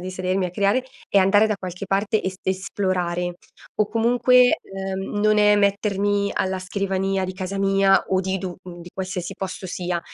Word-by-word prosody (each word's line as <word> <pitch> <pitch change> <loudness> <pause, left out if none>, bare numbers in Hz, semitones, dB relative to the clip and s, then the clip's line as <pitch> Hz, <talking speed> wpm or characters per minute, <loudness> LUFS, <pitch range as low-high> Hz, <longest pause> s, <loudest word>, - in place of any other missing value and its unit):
di 185 +1 -5
sedermi 185 +1 -1
a 175 - -6
creare, 205 +7 +1 0.2
è 200 - +4
andare 205 +3 +4
da 215 - 0
qualche 180 +1 -6
parte 200 +3 +1
e - - -4
est 190 0 -9
esplorare. 185 -2 -1 0.5
O 210 - +2
comunque, 245 +3 +4
uhm, 195 +1 -5
non 215 0 +3
è 210 0 +5
mettermi 200 0 +1
alla 190 0 -1
scrivania 195 0 -1
di 185 - -4
casa 190 +1 -4
mia 195 0 +3
o 190 0 +2
di 190 0 -2
du 180 -1 -5 0.3
di 170 - -10
qualsiasi 185 -1 -4
posto 190 -1 -6
sia. 175 -1 -3
195 Hz, 180 wpm, -23 LUFS, 185-205 Hz, 0.5 s, è